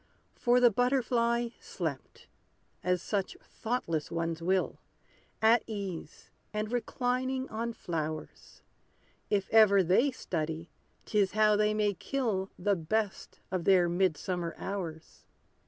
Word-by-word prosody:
For 245 0 +3
the 245 -1 +6
butterfly 240 -1 +1
slept; 160 -8 -5 0.6
as 180 -1 +1
such 200 -3 -2
thoughtless 170 -10 -3
ones 165 0 -2
will, 185 +2 0 0.6
At 225 +1 +6
ease, 195 -8 -6 0.2
and 215 +1 -3
reclining 255 +2 -1
on 230 +2 -3
flowers; 155 -5 -5 0.7
If 200 -2 +1
ever 205 -3 +7
they 190 - +4
study, 165 - -4 0.3
'tis 205 -3 +1
how 215 0 +4
they 210 0 +2
may 210 -1 +2
kill 200 -2 -2
The 200 +2 +1
best 200 +5 -2
of 185 -3 -2
their 185 -3 +5
mid 175 -2 +1
summer 175 -3 -3
hours! 170 -5 -6
200 Hz, 120 wpm, -30 LUFS, 175-230 Hz, 0.7 s, ever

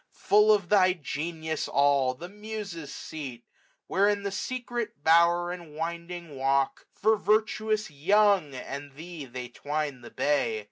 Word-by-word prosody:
Full 210 +1 +5
bf 185 -4 -13
thy 185 -3 +5
genius 160 0 -4
all! 140 -2 +3
the 170 +7 -8
Muses' 205 -6 -7
seat: 130 -6 -7 0.4
Where 200 +2 +3
in 205 -1 0
the 200 - -2
secret 240 - -4
bower, 170 +2 +4
and 170 -4 -9
winding 170 0 -5
walk, 135 +1 0
66^ - - -29
For 220 +1 +4
virtuous 215 -1 +1
Young 185 0 +3
and 140 +2 -7
thee 160 0 -8
they 125 0 -7
twine 145 0 -3
the 120 - -10
bay. 130 -7 +1
170 Hz, 145 wpm, -28 LUFS, 145-200 Hz, 0.4 s, Full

